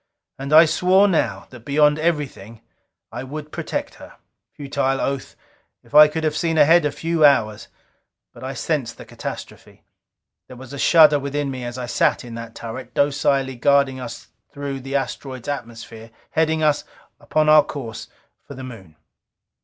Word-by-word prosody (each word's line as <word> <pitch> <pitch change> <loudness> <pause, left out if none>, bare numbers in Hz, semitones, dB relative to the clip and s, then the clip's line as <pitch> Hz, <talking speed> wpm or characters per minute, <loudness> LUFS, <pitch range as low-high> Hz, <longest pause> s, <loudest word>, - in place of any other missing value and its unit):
And 135 +1 -5
I 160 +2 +8
swore 180 +5 +3
now, 175 -5 -1
that 125 - -11
beyond 150 +4 +2
everything, 140 - -3 0.5
I 120 - -6
would 150 +3 -8
protect - - -4
her. - - -13 0.4
Futile 135 -1 -2
oath! 135 -1 -3 0.5
If - - -23
I 150 0 +9
could 160 +1 -4
have 155 -1 0
seen 165 0 -1
ahead 165 +2 +5
a 145 - 0
few 165 +1 -1
hours! 110 -8 +3 0.7
But - - -13
I - - -5
sensed - - -2
the - - -11
catastrophe. - - -9 0.6
There 125 - -12
was 130 +2 -11
a 140 - -7
shudder 155 -2 +6
within 140 0 -3
me 130 -1 -6
as 120 +1 -6
I 125 - -4
sat 120 - 0
in 120 - -9
that 115 0 -8
turret, 115 +3 -8
docilely 140 -2 +1
guiding 140 0 +2
us 125 -2 -8
out - - -35
through 140 -1 -5
the 135 +1 -6
asteroid's 135 -2 -4
atmosphere, 115 -4 -7 0.2
heading 160 0 +1
us 150 -1 +2 0.4
upon 155 0 0
our 155 -1 +7
course 115 -8 -7 0.4
for 140 - -11
the 130 - -9
Moon. 100 -11 -11
140 Hz, 170 wpm, -21 LUFS, 125-150 Hz, 0.7 s, I